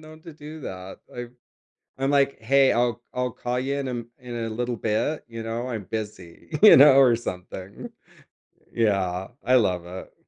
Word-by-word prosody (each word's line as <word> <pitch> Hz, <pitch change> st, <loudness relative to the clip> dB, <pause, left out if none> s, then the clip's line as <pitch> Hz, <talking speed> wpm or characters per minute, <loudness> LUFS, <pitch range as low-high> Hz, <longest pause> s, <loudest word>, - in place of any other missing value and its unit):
known 155 Hz, 0 st, -14 dB
to 165 Hz, -, -10 dB
do 150 Hz, +1 st, -10 dB
that, 95 Hz, 0 st, -8 dB, 0.2 s
I've 120 Hz, 0 st, -7 dB, 0.7 s
I'm 135 Hz, +1 st, 0 dB
like, 140 Hz, -2 st, +2 dB
"Hey, 135 Hz, +4 st, +4 dB
I'll 120 Hz, 0 st, 0 dB
I'll 125 Hz, -1 st, -1 dB
call 125 Hz, +2 st, -3 dB
you 135 Hz, +2 st, -2 dB
in 135 Hz, -1 st, -3 dB
a -, -, -3 dB
m 120 Hz, -1 st, -5 dB
in 125 Hz, -1 st, -8 dB
a 115 Hz, -1 st, -3 dB
little 120 Hz, +2 st, -3 dB
bit, 110 Hz, +8 st, -1 dB
you 115 Hz, -1 st, -7 dB
know, 115 Hz, +2 st, -4 dB
I'm 110 Hz, -5 st, -4 dB
busy," 105 Hz, -6 st, -7 dB
you 215 Hz, -, +10 dB
know, 140 Hz, 0 st, +8 dB
or 125 Hz, -4 st, +6 dB
something. 95 Hz, -2 st, -7 dB, 0.8 s
Yeah, 95 Hz, -5 st, 0 dB, 0.2 s
I 130 Hz, +2 st, +3 dB
love 90 Hz, -7 st, +2 dB
it. 90 Hz, +1 st, -9 dB
120 Hz, 180 wpm, -24 LUFS, 105-135 Hz, 0.8 s, you